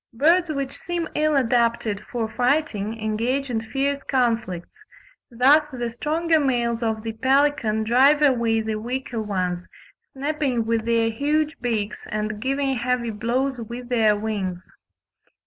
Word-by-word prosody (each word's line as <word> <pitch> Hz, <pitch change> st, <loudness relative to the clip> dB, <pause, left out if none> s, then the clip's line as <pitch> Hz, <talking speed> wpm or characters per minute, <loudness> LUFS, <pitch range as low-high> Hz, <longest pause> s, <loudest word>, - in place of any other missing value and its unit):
Birds 335 Hz, +7 st, +3 dB
which 275 Hz, -3 st, -3 dB
seem 345 Hz, -1 st, -3 dB
ill 305 Hz, 0 st, +2 dB
adapted 235 Hz, -5 st, +1 dB
for 235 Hz, -3 st, -1 dB
fighting 235 Hz, -3 st, 0 dB
engage 235 Hz, +5 st, -1 dB
in 225 Hz, -2 st, -1 dB
fierce 275 Hz, +5 st, -1 dB
conflicts; 230 Hz, -9 st, -1 dB, 0.6 s
thus 280 Hz, +6 st, +4 dB
the 240 Hz, -2 st, -3 dB
stronger 320 Hz, +6 st, +1 dB
males 240 Hz, -4 st, 0 dB
of 220 Hz, -2 st, -1 dB
the 225 Hz, -1 st, -4 dB
pelican 260 Hz, -3 st, +2 dB
drive 265 Hz, +6 st, +5 dB
away 235 Hz, -5 st, +3 dB
the 220 Hz, -1 st, -3 dB
weaker 245 Hz, 0 st, -4 dB
ones, 185 Hz, -4 st, -2 dB, 0.5 s
snapping 275 Hz, -4 st, -1 dB
with 225 Hz, -1 st, 0 dB
their 230 Hz, -1 st, +2 dB
huge 300 Hz, +5 st, 0 dB
beaks 220 Hz, -4 st, -2 dB
and 215 Hz, 0 st, -3 dB
giving 270 Hz, +1 st, 0 dB
heavy 240 Hz, -1 st, -1 dB
blows 245 Hz, +5 st, -1 dB
with 240 Hz, +2 st, -7 dB
their 220 Hz, -4 st, +3 dB
wings. 195 Hz, -4 st, -3 dB
240 Hz, 135 wpm, -23 LUFS, 220-275 Hz, 0.6 s, drive